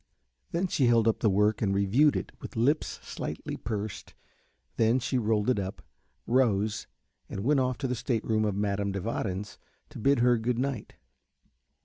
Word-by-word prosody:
Then 170 +3 0
she 140 -8 +2
held 115 -1 +4
up 115 - +2
the 110 - +3
work 105 +2 +2
and 100 -3 +1
reviewed 115 +10 +4
it - - -3
with - - -8
lips 140 +7 +1
slightly - - -5
pursed, 105 -1 -5 0.6
then 115 +2 +3
she 130 0 0
rolled 105 -2 +1
it 125 -5 +2
up, 95 0 -5 0.4
rose, 110 -4 +1 0.4
and 100 - -4
went 140 +3 +3
off 130 -2 0
to 135 - -2
the 125 - -1
state 115 -1 -2
room 110 -1 +1
of 105 -2 0
Madame 100 0 0
de 100 - -3
Warens 105 -1 -3 0.3
to - - -10
bid 140 +5 +3
her 120 -1 +4
good 120 +1 -1
night. 130 -3 -3
110 Hz, 175 wpm, -28 LUFS, 105-125 Hz, 0.6 s, held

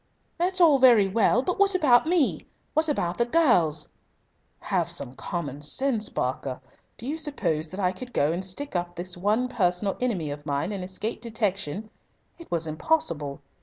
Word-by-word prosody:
"That's 365 +2 +1
all 310 -6 +6
very 235 -6 +6
well. 225 +4 +2
But 365 - -2
what 400 -1 +4
about 295 -5 +4
me? 335 -5 +1 0.3
What 315 0 +2
about 180 -11 -1
the 235 - +3
girls?" 180 - +3 0.7
"Have - - -1
some 125 - -2
common 145 0 -5
sense, 220 - +1
Barker. 130 0 -3 0.4
Do 230 - -9
you 300 +5 -3
suppose 170 - -1
that 185 - -7
I 180 -2 +2
could 245 +7 -9
go 150 -8 +1
and 175 +3 -2
stick 190 +8 -5
up 175 0 -2
this 175 +1 -2
one 210 +7 +1
personal 195 -4 0
enemy 190 -12 -1
of 145 0 -7
mine 145 +5 -2
and 195 -3 -4
escape 190 +5 -5
detection? 215 -4 -2 0.5
It 335 - -12
was 170 -1 0
impossible. 155 - -1
200 Hz, 170 wpm, -26 LUFS, 170-260 Hz, 0.7 s, all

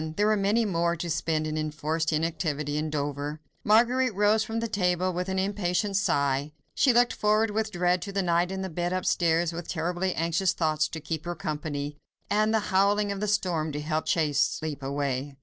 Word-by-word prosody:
There 205 - +2
were 215 0 +4
many 210 +3 +2
more 170 -3 +1
to 170 0 -4
spend 155 0 0
in 155 0 -2
enforced 155 +1 -1
inactivity 155 -2 -1
in 155 +1 -1
Dover. 145 0 -3 0.2
Marguerite 240 +2 +3
rose 210 +2 +3
from 225 +1 -3
the 230 - -2
table 185 -3 0
with 180 +2 -3
an 190 - -1
impatient 195 0 0
sigh. 140 -5 +1 0.2
She 265 - +4
looked 240 0 +4
forward 215 +1 +2
with 220 +1 -1
dread 180 -1 +1
to 200 - -5
the 195 -1 0
night 175 +1 +1
in 190 0 -3
the 190 - -4
bed 175 +2 -2
upstairs, 170 -2 +1
with 170 0 -6
terribly 175 +2 -1
anxious 170 +3 +1
thoughts 155 -2 +1
to 160 - -6
keep 160 0 -4
her 175 0 -3
company, 150 -2 -4 0.3
and 215 +1 +3
the 220 - +3
howling 200 +2 +3
of 200 - -4
the 210 - -1
storm 180 -7 0
to 145 - -3
help 155 +1 -2
chase 150 -4 +1
sleep 155 -2 -1
away. 140 0 -2
175 Hz, 200 wpm, -27 LUFS, 155-200 Hz, 0.3 s, were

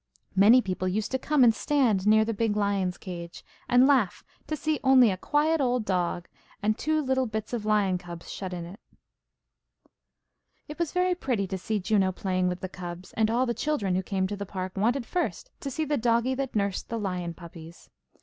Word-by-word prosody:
Many 220 +6 +6
people 185 -1 -2
used 205 +3 -1
to 260 - 0
come 295 0 +3
and 230 -2 +6
stand 225 -9 +1
near 220 +1 +5
the 230 - -1
big 210 0 0
lion's 200 -3 0
cage, 170 -2 -8 0.2
and 250 +1 +6
laugh 260 -9 +2 0.2
to 310 - -2
see 305 0 -1
only 260 -4 +6
a - - -1
quiet 300 - +1
old 250 -3 +1
dog, 175 -2 -1 0.4
and 215 +1 +2
two 310 +4 0
little 260 -1 +1
bits 220 +1 -5
of 220 -3 -3
lion 200 -4 +2
cubs 175 -2 -10
shut 190 -2 -5
in 175 -2 -5
it. 180 +5 -11 1.9
It 300 +3 -9
was 340 -3 0
very 365 0 +2
pretty 250 - -1
to 190 0 -4
see 215 +3 -2
Juno 195 -1 +2
playing 185 -1 -1
with 180 0 -3
the 190 - -3
cubs, 180 -1 -8
and 220 -1 +1
all 240 +3 +2
the 240 - -1
children 235 -10 -1
who 185 - +1
came 190 0 -1
to 205 +2 -3
the 200 - -5
park 185 -1 -5
wanted 235 +6 +1
first 360 - -3
to 280 - -4
see 310 +4 -2
"the 295 0 0
doggie 235 +2 +2
that 265 -2 -4
nursed 200 -2 -1
the 230 - -2
lion 180 -5 -3
puppies." 170 -1 -12
215 Hz, 205 wpm, -27 LUFS, 185-260 Hz, 1.9 s, Many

